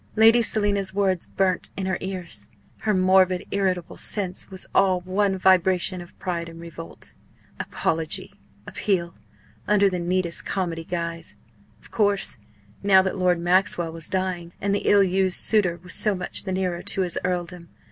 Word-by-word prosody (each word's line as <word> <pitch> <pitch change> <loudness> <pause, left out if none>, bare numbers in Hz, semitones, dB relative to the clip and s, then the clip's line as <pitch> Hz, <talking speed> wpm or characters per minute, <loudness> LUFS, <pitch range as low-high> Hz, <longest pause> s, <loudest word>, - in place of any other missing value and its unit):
Lady 225 +2 +6
Selina's 200 -3 0
words 190 -3 +1
burnt 190 -2 0
in 190 - -2
her 190 -1 -1
ears. 180 - -6 0.3
Her 215 - 0
morbid, 185 -1 +4
irritable 185 -3 -1
sense 190 -3 -1
was 190 -1 -4
all 185 -2 +3
one 190 +2 0
vibration 185 -1 +3
of 175 - -14
pride 170 -2 -3
and 165 0 -11
revolt. 165 -1 -9 0.5
Apology 160 -1 -2 0.3
appeal 175 -5 -1 0.5
under 200 -1 +4
the 180 - -2
neatest 175 0 -1
comedy 170 -4 -3
guise! 170 -1 -4 0.4
Of - - -17
course! 205 - 0 0.4
now 190 -1 +5
that 190 - -2
Lord 180 -2 +2
Maxwell 175 -1 +2
was 165 -1 -4
dying, 185 -2 -2
and 200 0 0
the 200 - 0
ill 200 -1 +6
used 190 0 +1
suitor 180 -6 +2
was 180 - -6
so 210 -3 +2
much 180 +2 -1
the 190 - -3
nearer 185 -2 -1
to 195 - -2
his 180 -2 -1
earldom. 175 -1 -3
185 Hz, 155 wpm, -24 LUFS, 175-195 Hz, 0.5 s, Lady